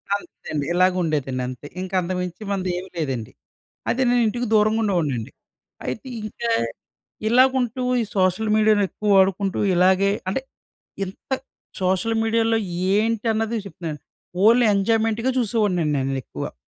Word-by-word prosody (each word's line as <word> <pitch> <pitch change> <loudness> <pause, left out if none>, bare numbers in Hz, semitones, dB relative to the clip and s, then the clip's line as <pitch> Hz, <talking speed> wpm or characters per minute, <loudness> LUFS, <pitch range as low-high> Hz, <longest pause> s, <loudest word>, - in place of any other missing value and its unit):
అంతే 200 - -10
అండి. 145 -2 -1
ఇలాగ 185 +1 +4
ఉండేదండి. 135 -5 -1
అంతే 130 +3 -8
ఇంక 185 0 -6
అంతకుమించి 180 +2 -4
మనదేం 185 -1 -2
లేదండి. 130 -8 -3 0.6
అదే 260 - +1
నేను 245 0 +3
ఇంటికి 240 +2 -2
దూరంగా 215 +1 +4
ఉండేవాడినండి. 150 - -1 0.5
అయితే 260 - -4 0.2
ఇంకా 230 +2 -4 0.8
ఇలాగుంటూ 255 0 +3 0.2
ఈ - - 0
సోషల్ 185 +4 +2
మీడియాని 215 -1 +4
ఎక్కువ 210 -1 -3
వాడుకుంటూ 195 0 +2 0.2
ఇలాగే 190 +2 +4 0.2
అంటే 265 +7 -1 0.6
ఇంత 190 - -12 0.5
సోషల్ 190 +5 +1
మీడియాలో 225 0 +2 0.4
ఏంటన్నది 225 +1 0
చెప్తున్నాను. 165 -6 -6 0.5
ఓన్లీ 235 +1 +6
ఎంజాయ్మెంట్‌గా 225 +4 +1
చూసేవాడినండి 195 -9 +1 0.2
నేనెక్కువ. 135 -2 -5
200 Hz, 120 wpm, -23 LUFS, 180-225 Hz, 0.8 s, ఓన్లీ